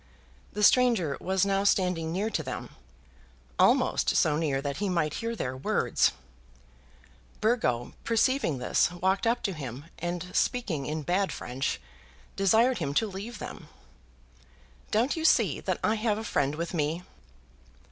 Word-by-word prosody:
The 210 - -3
stranger 225 - +4
was 190 +1 +1
now 195 0 +1
standing 180 -5 +1
near 200 +6 -1
to 170 - -1
them, 130 -4 -6 0.9
almost - - +3
so 150 - +3
near 150 -4 0
that 140 0 -3
he 205 -1 -1
might 160 -4 0
hear 230 0 -2
their 130 - -3
words. 130 - +1 1.3
Burgo, 170 - 0
perceiving 230 - +1
this, 125 - +2
walked 190 +4 0
up 240 +1 +1
to 195 - -1
him, 135 -3 -7
and, 175 +1 -4
speaking 180 - 0
in 155 0 -3
bad 185 +5 0
French, 130 +3 -3 0.6
desired 220 +5 +3
him 140 -4 -3
to 225 - +3
leave 210 +3 -7
them. - - -8 1.2
"Don't 235 +6 +1
you 320 - -3
see - - +3
that - - -2
I 215 - +3
have 215 -2 +1
a 220 - -4
friend 145 -9 0
with 170 +3 -4
me?" 160 +2 -1
180 Hz, 145 wpm, -28 LUFS, 150-220 Hz, 1.3 s, stranger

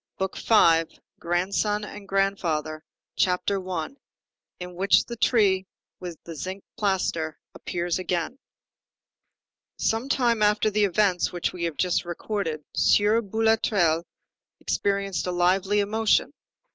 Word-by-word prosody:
BOOK 190 0 -2
FIFTH—GRANDSON 185 +2 +1
AND 210 -1 -9
GRANDFATHER 170 -6 -1 0.3
CHAPTER 185 +1 0
I—IN 180 - -9
WHICH 190 +3 +3
THE 235 - -6
TREE 200 -5 +2 0.3
WITH 175 -3 -7
THE 170 - -8
ZINC 185 +7 -6
PLASTER 180 -6 -1 0.2
APPEARS 175 0 -3
AGAIN 180 +6 -2 1.4
Some 225 +5 -1
time 240 -5 +2
after 210 +1 +3
the 210 0 +3
events 195 -1 +1
which 175 -1 -2
we 170 -1 -3
have 165 -3 -4
just 180 -1 +1
recorded, 175 -3 -4
Sieur 210 +3 +3
Boulatruelle 210 -6 +1 0.6
experienced 195 -2 -1
a - - 0
lively 190 +3 +2
emotion. 215 +2 +1
190 Hz, 110 wpm, -25 LUFS, 175-210 Hz, 1.4 s, WHICH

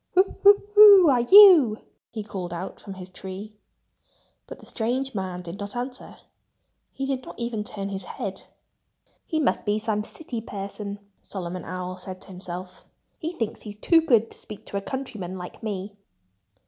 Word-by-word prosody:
"Who 375 +2 +3
who 405 0 +7
who 405 -5 +9
are 245 -2 +3
you?" 320 - +8 0.3
he 220 -2 -6
called 185 -4 -6
out 175 +3 -6
from 195 -2 -9
his 185 -1 -9
tree. 195 +3 -9 0.9
But - - -9
the - - -15
strange 255 +4 -2
man 185 -3 -4
did 175 +3 -8
not 205 +1 -6
answer. 250 +1 -6 0.7
He 270 - -5
did 270 -1 -2
not - - -11
even 235 -3 -3
turn 200 -1 -5
his 195 -2 -5
head. 190 -1 -6 0.8
"He 315 - -1
must 300 - +1
be 210 0 0
some 215 -1 -1
city 240 -1 -7
person," 200 -1 -6 0.2
Solomon 180 -2 -6
Owl 185 +1 -5
said 185 0 -8
to - - -12
himself. 180 0 -8 0.4
"He 325 +2 -4
thinks 225 -10 -4
he's 210 -1 -8
too 325 - +4
good 230 -8 +2
to - - -9
speak 215 0 -11
to 200 - -5
a - - -2
countryman 210 -7 -5
like 180 -1 -9
me." 205 -2 -5
210 Hz, 175 wpm, -25 LUFS, 190-255 Hz, 0.9 s, who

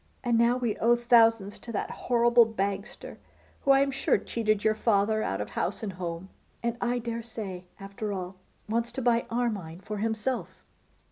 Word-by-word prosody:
And 240 -2 +2
now 235 +2 +4
we 240 -4 -1
owe 235 +2 +4
thousands 230 -4 +4
to 235 - -8
that 205 - -2
horrible 235 -1 +4
Bagster, 200 0 -4 0.4
who - - -4
I 275 0 +7
am 275 0 +1
sure 270 - +2
cheated 215 -3 -1
your 220 - +4
father 215 0 +2
out - - -2
of - - -4
house - - -2
and 200 -3 -3
home, 175 0 -5 0.3
and 235 0 0
I 245 0 +1
dare 235 -1 -3
say, 200 -6 -6
after 200 +2 -5
all, 185 -1 -5 0.3
wants 230 +2 -1
to 265 - -3
buy 235 -1 +2
Armine 210 -9 -2
for 210 +1 -5
himself. 225 +4 -2
225 Hz, 180 wpm, -28 LUFS, 200-240 Hz, 0.4 s, I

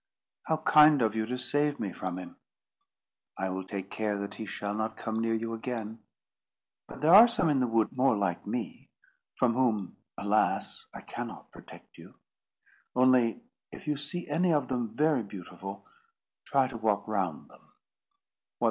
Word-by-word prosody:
"How 160 - +2
kind 150 -3 +6
of 110 -2 +1
you 110 0 -1
to 125 +1 -3
save 145 +3 0
me 100 -4 -3
from 95 -1 -4
him!" 90 - -9 1.0
"I 95 - -2
will 95 0 -3
take 95 0 -6
care 105 -2 -1
that 100 0 -5
he 110 - -7
shall 100 0 -4
not 110 +1 -3
come 110 -1 -3
near 115 0 +1
you 115 +1 -3
again. 115 -1 -5 0.9
But - - -11
there 160 +3 +5
are 220 +5 +11
some 235 -8 +1
in 145 -3 +2
the 125 - +2
wood 115 -1 +1
more 130 -3 +3
like 95 -4 -2
me, - - -5 0.5
from 120 -2 +2
whom, 115 -6 0 0.2
alas! - - 0
I - - -9
cannot - - -8
protect - - -15
you. - - -14 0.8
Only 125 - +3 0.3
if - - -11
you 150 -1 0
see 150 +5 -4
any 180 0 +2
of 145 -5 +1
them 120 -4 -2
very 150 -4 +3
beautiful, 95 -1 -9 0.6
try 135 -2 +2
to 125 -3 -7
walk 105 -2 0
round 95 -7 -2
them." - - -21
115 Hz, 165 wpm, -29 LUFS, 100-135 Hz, 1.0 s, are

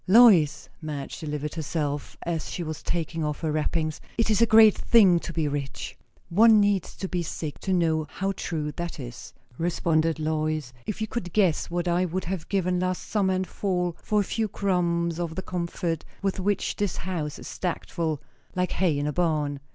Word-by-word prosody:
"Lois," 185 - +6
Madge 150 -3 -5
delivered 150 -1 -4
herself 150 -2 -3
as 165 -2 -2
she 175 - -3
was 155 -1 -5
taking 165 -1 -2
off 150 -1 -2
her 160 - 0
wrappings, 155 0 -1 0.2
"it 230 -1 +2
is 215 - +3
a 230 - +6
great 220 -2 +8
thing 195 -7 +5
to 170 - -6
be 160 -2 0
rich!" 140 -1 -4 0.3
"One 220 +4 +6
needs 205 -3 +1
to 190 - -4
be 180 -1 -1
sick 155 -2 -5
to 190 - -3
know 160 -4 +2
how 195 +1 -2
true 155 -5 -3
that 170 -2 -4
is," 120 -3 -8 0.3
responded 165 -1 +1
Lois. 155 -3 -1
"If 215 - -3
you 220 - 0
could 180 -7 -4
guess 190 -7 +2
what 175 +1 -1
I 175 +1 +2
would 185 +2 -2
have 175 -2 -4
given 180 -2 +1
last 185 0 -2
summer 190 -3 +2
and 185 0 0
fall 180 -3 -1
for 210 -1 +1
a - - +3
few 220 +2 -1
crumbs 170 -4 0
of 170 -2 -3
the 190 - -4
comfort 170 -2 -2 0.2
with 195 -1 0
which 200 +1 0
this 205 -4 -1
house 165 -5 -3
is - - -9
stacked 180 -2 -4
full 160 -5 -2 0.3
like 180 -1 0
hay 170 -5 +1
in 145 - -1
a 150 - -1
barn!" 150 -4 0
170 Hz, 195 wpm, -26 LUFS, 155-190 Hz, 0.3 s, great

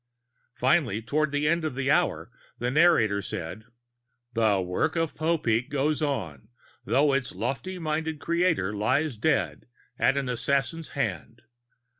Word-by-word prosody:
Finally, 130 - +2
toward 145 +6 0
the 145 +1 0
end 170 +1 +2
of 155 -5 -2
the 135 +1 0
hour, - - +1 0.3
the 120 +1 -1
narrator 130 -10 +4
said, 95 +4 -6 0.7
"The 110 -4 +3
work 90 - -1
of 165 -2 0
Popeek 145 -6 0
goes 145 +2 0
on, 95 - -3 0.4
though 140 +1 +3
its 135 -2 -1
lofty 185 +8 -3
minded 160 -1 -2
creator 170 - +1
lies 130 +7 +1
dead 105 - 0 0.3
at 135 - +3
an 140 -2 -1
assassin's 140 +6 -1
hand. 110 - -3
140 Hz, 135 wpm, -27 LUFS, 115-155 Hz, 0.7 s, narrator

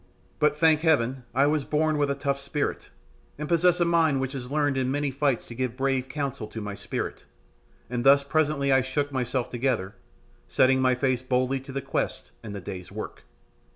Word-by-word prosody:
But, 150 -1 +3
thank 160 -1 +4
Heaven, 130 -6 +1
I 135 +2 +5
was 150 0 +1
born 155 +1 +1
with 145 -1 +2
a 140 - 0
tough 140 0 -1
spirit, 140 +1 -3 0.5
and 150 +1 -4
possess 175 +1 +3
a 175 - +3
mind 165 -5 +3
which 130 +1 -2
has 125 -2 -6
learned 145 -2 +1
in 130 -1 0
many 145 +1 0
fights 135 -2 0
to - - -8
give 125 0 -3
brave 135 -1 0
counsel 135 -6 -3
to 110 - -7
my 105 -1 -5
spirit, - - -5 0.6
and 120 0 -2
thus 140 +1 +6
presently 145 -1 +1
I 135 0 +5
shook 145 +2 -2
myself 125 -1 -2
together, 120 -6 -1 0.5
setting 130 0 +3
my 130 -1 +3
face 130 -1 0
boldly 130 +1 0
to 135 +1 -10
the 135 0 -4
quest 135 - -3
and 105 -2 -7
the - - -4
day's 90 0 -7
work. - - -7
135 Hz, 195 wpm, -26 LUFS, 125-145 Hz, 0.6 s, thus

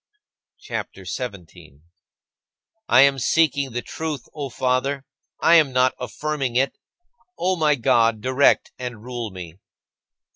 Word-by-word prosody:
CHAPTER - - -6
XVII 125 - -3 0.2
22. 70 -2 -18 1.1
I 125 - +7
am 140 0 +4
seeking 140 0 +2
the 120 +1 -4
truth, 155 -4 -5
O 145 -3 -5
Father; 130 +2 -1 0.3
I 165 - +4
am 150 -4 +3
not 130 0 +3
affirming 135 -1 -3
it. 130 +1 +1 0.6
O 185 +2 +1
my 155 -3 +2
God, 115 -3 +2
direct 130 +5 +2
and 120 -4 -6
rule 120 -2 -5
me. 90 -2 -10
130 Hz, 130 wpm, -22 LUFS, 120-145 Hz, 1.1 s, I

